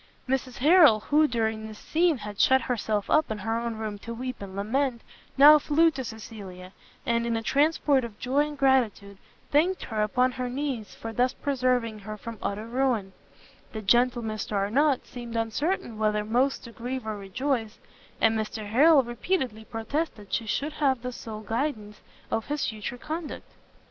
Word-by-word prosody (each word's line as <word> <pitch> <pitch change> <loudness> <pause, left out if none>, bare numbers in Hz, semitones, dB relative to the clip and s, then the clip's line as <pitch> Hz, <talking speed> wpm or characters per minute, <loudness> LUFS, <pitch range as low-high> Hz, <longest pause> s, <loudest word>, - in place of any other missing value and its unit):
Mrs 255 -1 -2
Harrel, 295 - +6
who 305 +5 +3
during 220 -3 -1
this 215 -1 -10
scene 330 +3 +1
had 210 -2 -8
shut 265 0 +5
herself 220 -3 -1
up 310 - +3
in 220 - -3
her 225 +3 -2
own 235 -1 -3
room 215 -2 -5
to 230 +3 -7
weep 255 0 -5
and 195 -1 -8
lament, 235 +4 -1 0.3
now 300 +2 +9
flew 320 +3 +3
to 270 -3 -5
Cecilia, 200 -5 -9 0.3
and 235 -2 +1
in 230 -1 0
a 225 - -4
transport 285 0 +2
of 225 -3 -7
joy 280 +6 +1
and 295 -1 -8
gratitude, 235 -8 +1 0.3
thanked 345 +6 +2
her 220 -2 -2
upon 250 +4 +2
her 250 0 -4
knees 255 -5 -4
for 225 0 -7
thus 250 +3 +2
preserving 250 -5 0
her 215 +1 -7
from 230 0 -8
utter 205 +2 -3
ruin: 235 -5 0 0.6
the 220 - -4
gentle 240 +3 +3
Mr 215 -1 -4
Arnott 250 +8 +2
seemed 240 -2 -8
uncertain 230 - -1
whether 210 -1 +1
most 250 +5 +1
to 235 - -10
grieve 245 +1 -5
or 215 -1 -3
rejoice; 225 +3 -2 0.4
and 225 0 +3
Mr 215 -1 -3
Harrel 280 +5 +6
repeatedly 240 - -2
protested 225 - -4
she 225 - -1
should 290 +7 -2
have 270 -5 +1
the 250 - -3
sole 220 -3 -8
guidance 220 -2 -3 0.3
of 225 -1 -1
his 295 0 -1
future 215 +2 -5
conduct. 310 +4 -6
235 Hz, 175 wpm, -27 LUFS, 215-270 Hz, 0.6 s, now